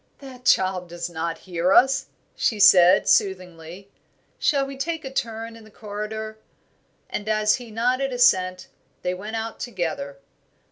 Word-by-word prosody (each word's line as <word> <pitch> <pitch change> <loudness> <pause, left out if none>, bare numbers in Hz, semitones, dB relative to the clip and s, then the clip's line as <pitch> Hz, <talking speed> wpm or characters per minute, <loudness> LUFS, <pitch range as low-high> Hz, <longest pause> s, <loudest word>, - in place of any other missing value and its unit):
"That 255 -3 -13
child 185 -2 +2
does 175 0 -6
not 165 0 -3
hear 180 0 -1
us," 265 +2 +4 0.3
she 215 - 0
said, 185 -2 +6
soothingly. 185 0 -1 0.5
"Shall 280 -3 +2
we 275 0 -8
take 320 +3 -4
a 265 - -7
turn 230 -2 -4
in 225 - -14
the 215 - -16
corridor?" 215 +1 -7 0.7
And 210 +1 -5
as 215 0 +2
he 245 -2 -11
nodded 250 +5 0
assent, 185 -7 +2 0.4
they 180 - -1
went 210 +5 -7
out 225 0 -5
together. 165 - -4
210 Hz, 145 wpm, -23 LUFS, 180-240 Hz, 0.7 s, said